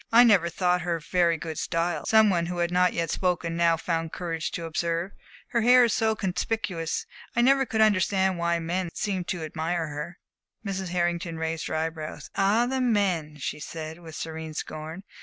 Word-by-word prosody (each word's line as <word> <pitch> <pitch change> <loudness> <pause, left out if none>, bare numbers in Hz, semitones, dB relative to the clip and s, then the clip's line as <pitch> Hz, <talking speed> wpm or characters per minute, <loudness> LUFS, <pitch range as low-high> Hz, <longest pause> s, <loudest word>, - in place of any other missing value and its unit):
"I 235 +2 +8
never 195 -8 +5
thought 180 0 +1
her 175 -1 -1
very 170 +1 +2
good 160 -1 -5
style," 170 +1 -1
some 220 -2 +6
one 170 -2 +1
who 175 0 -4
had 175 0 0
not 180 0 +3
yet 165 -2 -1
spoken 175 -2 0
now 170 -1 +3
found 165 -1 -2
courage 165 -3 -3
to 170 - -4
observe. 170 +3 -1 0.4
"Her 235 -2 +1
hair 250 +2 +7
is 230 -2 +2
so 220 -1 +2
conspicuous. 190 -4 -2 0.3
I 240 - +4
never 270 +1 +4
could 220 0 0
understand 190 -3 +3
why 170 0 +1
men 175 +2 -2
seemed 190 -4 -2
to 175 -3 -3
admire 160 +1 -2
her." 150 +4 -6 0.5
Mrs. 190 -2 -3
Hartington 175 -1 -1
raised 160 0 -2
her - - -3
eye 160 +1 0
brows. 155 -1 -8
"Ah, 205 +5 +3
the 260 +1 -1
men!" 190 -10 +1
she 150 +2 -4
said, 160 +2 -7
with 160 -3 -10
serene 160 -1 -6
scorn. 160 +5 -6
175 Hz, 190 wpm, -26 LUFS, 165-195 Hz, 0.5 s, I